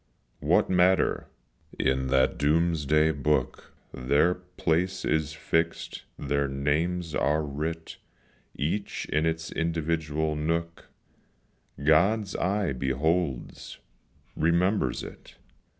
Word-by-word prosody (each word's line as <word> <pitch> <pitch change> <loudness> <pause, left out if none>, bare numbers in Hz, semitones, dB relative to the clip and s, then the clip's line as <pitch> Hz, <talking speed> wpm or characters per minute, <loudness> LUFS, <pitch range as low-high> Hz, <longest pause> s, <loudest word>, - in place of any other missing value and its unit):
What - - +3
matter, 90 0 +2 0.5
in 65 0 +1
that 65 0 +2
doom's 80 0 +1
day 75 +2 +4
book 75 +1 -1 0.2
Their 70 +7 +2
place 90 0 -2
is 75 -1 0
fixed 80 +1 -2
their 70 0 0
names 80 +5 -1
are 75 +2 +1
writ, 80 +3 -5 0.6
Each 85 +8 -2
in 75 +2 0
its 80 0 -3
individual 80 -2 -1
nook, 85 +2 -3 0.9
God's 95 +7 +3
eye 95 -4 0
beholds 70 +3 -2 0.6
remembers 85 - +1
it. - - -12
80 Hz, 95 wpm, -27 LUFS, 75-85 Hz, 0.9 s, day